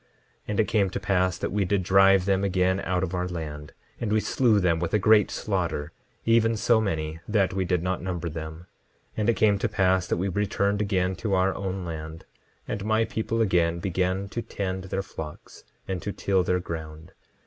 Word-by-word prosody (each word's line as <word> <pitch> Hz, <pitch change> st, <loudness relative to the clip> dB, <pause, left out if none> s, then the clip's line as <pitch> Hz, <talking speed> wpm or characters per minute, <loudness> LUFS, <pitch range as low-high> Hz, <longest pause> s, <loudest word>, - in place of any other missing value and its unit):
10:20 -, -, -37 dB, 0.4 s
And 105 Hz, 0 st, -2 dB
it 110 Hz, -, +3 dB
came 100 Hz, -3 st, +2 dB
to 95 Hz, -, -4 dB
pass 95 Hz, -2 st, +1 dB
that -, -, -3 dB
we 100 Hz, +1 st, +1 dB
did 95 Hz, 0 st, 0 dB
drive 95 Hz, 0 st, +5 dB
them 95 Hz, 0 st, +1 dB
again 95 Hz, 0 st, +1 dB
out 90 Hz, -1 st, -1 dB
of 95 Hz, -1 st, -3 dB
our 90 Hz, 0 st, -1 dB
land; 75 Hz, -4 st, -6 dB, 0.3 s
and 110 Hz, -, -2 dB
we 110 Hz, -, +3 dB
slew 110 Hz, -1 st, +2 dB
them 85 Hz, -3 st, +2 dB
with 85 Hz, +4 st, -1 dB
a -, -, +6 dB
great 105 Hz, 0 st, +5 dB
slaughter, 75 Hz, +2 st, -2 dB, 0.3 s
even 115 Hz, 0 st, +3 dB
so 115 Hz, 0 st, +3 dB
many 80 Hz, -5 st, -2 dB
that 105 Hz, -4 st, +1 dB
we 95 Hz, -1 st, 0 dB
did 90 Hz, -1 st, 0 dB
not 90 Hz, 0 st, -1 dB
number 90 Hz, -1 st, -3 dB
them. 80 Hz, 0 st, -6 dB, 0.5 s
10:21 -, -, -28 dB
And 105 Hz, +1 st, +1 dB
it 115 Hz, -, +3 dB
came 105 Hz, -2 st, +3 dB
to 115 Hz, -, 0 dB
pass 95 Hz, -2 st, +2 dB
that -, -, 0 dB
we 95 Hz, +3 st, -1 dB
returned 100 Hz, +1 st, 0 dB
again 95 Hz, -2 st, 0 dB
to 105 Hz, -5 st, 0 dB
our 95 Hz, +1 st, +2 dB
own 95 Hz, -1 st, -4 dB
land, 80 Hz, -1 st, -7 dB, 0.4 s
and 100 Hz, -, -3 dB
my 110 Hz, +1 st, +2 dB
people 115 Hz, +1 st, -2 dB
again 85 Hz, -5 st, +2 dB
began 95 Hz, +2 st, -1 dB
to 120 Hz, -, -3 dB
tend 95 Hz, -3 st, -4 dB
their 95 Hz, +1 st, -2 dB
flocks, 75 Hz, -5 st, -9 dB, 0.2 s
and 95 Hz, -2 st, -3 dB
to 100 Hz, -, -3 dB
till 95 Hz, -1 st, +1 dB
their 90 Hz, 0 st, +1 dB
ground. 80 Hz, -2 st, -7 dB
95 Hz, 210 wpm, -26 LUFS, 90-100 Hz, 0.5 s, a